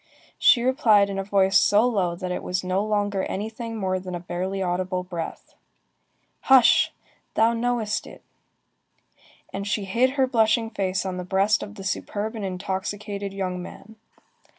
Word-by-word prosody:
She 240 - +5
replied 220 -7 +4
in 195 - -3
a - - -1
voice 195 -1 +3
so 210 +4 +4
low 190 -8 0
that 180 +1 -5
it 180 - -3
was 180 +1 -2
no 185 +2 0
longer 205 -2 0
anything 225 +3 -5
more 185 -2 -1
than 185 -1 -6
a - - -4
barely 180 +3 -4
audible 180 0 -1
breath:— 175 -3 -7 0.9
"Hush! 265 -3 +5 0.4
Thou 225 +1 +4
knowest 230 -3 -1
it!" - - -13 1.3
And 200 +1 -4
she 205 -1 -1
hid 245 +7 +1
her 265 - +4
blushing 225 -2 +2
face 195 -3 -1
on 185 -1 -3
the 180 - -4
breast 195 +4 +2
of 210 - -8
the 195 - -9
superb 205 +3 -3
and 220 -3 -6
intoxicated 195 +2 -4
young 185 -2 -3
man. 215 +4 -11
200 Hz, 160 wpm, -24 LUFS, 185-220 Hz, 1.3 s, She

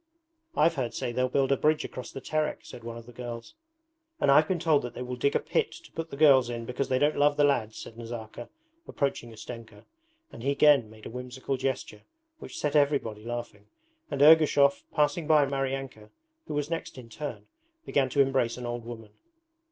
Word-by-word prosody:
'I've 165 +2 +4
heard 130 -6 -3
say 120 - -2
they'll 130 +1 0
build 135 +1 +1
a - - +5
bridge 155 0 +2
across 125 - -7
the 135 - -7
Terek,' 155 +2 -2
said 120 - -11
one 115 0 -6
of 115 - -10
the 120 - -12
girls. 120 -1 -7 0.7
'And 140 - +4
I've 150 +3 +6
been 185 - 0
told 160 -4 +3
that 125 - -7
they 125 - -4
will 125 0 -4
dig 140 +3 0
a - - +4
pit - - 0
to - - -14
put 165 0 -5
the 140 - -8
girls 135 -5 +6
in 115 -1 -4
because 125 +3 -3
they 130 - +2
don't 150 +3 +2
love 145 0 +4
the 145 - +4
lads,' 120 -7 +1
said 115 - -9
Nazarka, 115 0 -7 0.4
approaching 135 -5 -2
Ustenka; 110 -1 -10 0.5
and - - -10
he 135 - -1
again 140 -5 +5
made 110 0 -15
a - - -7
whimsical 125 +2 -4
gesture 135 0 -3 0.4
which - - -9
set 150 0 -1
everybody 140 -8 +1
laughing, 120 -3 -6 0.4
and 140 - +1
Ergushov, 150 -2 +6
passing 150 +2 +1
by 155 -2 +5
Maryanka, 135 -5 -3 0.4
who 150 - -4
was 145 -1 -1
next 165 -4 -4
in 125 -2 -10
turn, 145 +6 -7 0.4
began 135 -2 +1
to 140 - +3
embrace 135 -4 +1
an 125 - -6
old 120 0 -4
woman. 115 -2 -9
130 Hz, 205 wpm, -28 LUFS, 120-145 Hz, 0.7 s, I've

